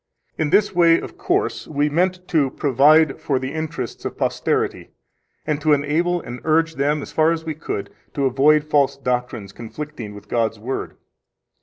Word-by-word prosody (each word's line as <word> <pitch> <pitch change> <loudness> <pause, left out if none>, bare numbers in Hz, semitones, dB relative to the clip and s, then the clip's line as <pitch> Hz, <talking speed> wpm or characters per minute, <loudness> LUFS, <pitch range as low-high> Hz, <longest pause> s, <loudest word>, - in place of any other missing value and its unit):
In 155 -2 -1
this 205 +4 +3
way, 170 -2 +5
of - - -9
course, - - -1
we 145 -1 0
meant 180 +4 0
to 150 -5 +2
provide 145 +2 +4
for 140 - 0
the 130 +2 -4
interests 155 -6 -5
of - - -5
posterity, - - -1 0.6
and 150 -1 -1
to 155 0 +4
enable 160 +5 +1
and 120 +1 -8
urge 160 +1 +2
them, 145 +1 0
as - - -9
far 160 +1 +3
as 165 -1 -3
we 160 - -2
could, 145 -9 -5 0.2
to 140 - 0
avoid 145 +4 +4
false 145 -3 +1
doctrines 125 -6 -3
conflicting 120 -2 -8
with 105 - -12
God's 115 -2 0
Word. 120 +6 -5
150 Hz, 170 wpm, -21 LUFS, 130-160 Hz, 0.6 s, way